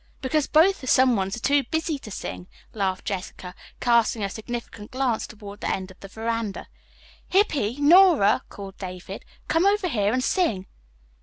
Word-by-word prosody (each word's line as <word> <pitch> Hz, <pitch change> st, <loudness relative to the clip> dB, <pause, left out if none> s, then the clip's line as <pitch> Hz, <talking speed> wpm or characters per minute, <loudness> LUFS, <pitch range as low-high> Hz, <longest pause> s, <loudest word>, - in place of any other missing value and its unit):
"Because 290 Hz, +2 st, 0 dB
both 350 Hz, +5 st, +4 dB
the 260 Hz, -, -8 dB
someones 230 Hz, -8 st, +3 dB
are -, -, -9 dB
too 280 Hz, +2 st, +3 dB
busy 320 Hz, +1 st, -2 dB
to 220 Hz, -, -11 dB
sing," 180 Hz, -2 st, -7 dB, 0.3 s
laughed 195 Hz, -3 st, -2 dB
Jessica, 185 Hz, -2 st, -5 dB, 0.3 s
casting 235 Hz, -2 st, +2 dB
a 195 Hz, -, -2 dB
significant 230 Hz, -2 st, -7 dB
glance 255 Hz, -3 st, -1 dB
toward 205 Hz, -1 st, -11 dB
the -, -, -2 dB
end 190 Hz, 0 st, -4 dB
of 185 Hz, -, -18 dB
the 195 Hz, -, -10 dB
veranda. 225 Hz, 0 st, -4 dB, 0.6 s
"Hippy, 290 Hz, -, +1 dB
Nora," 300 Hz, -, +6 dB
called 195 Hz, -1 st, -10 dB
David, 185 Hz, +1 st, -7 dB, 0.2 s
"come 330 Hz, +4 st, +2 dB
over 405 Hz, -2 st, +2 dB
here 210 Hz, -, 0 dB
and 255 Hz, +2 st, 0 dB
sing." 235 Hz, -, 0 dB
230 Hz, 160 wpm, -24 LUFS, 200-290 Hz, 0.6 s, Nora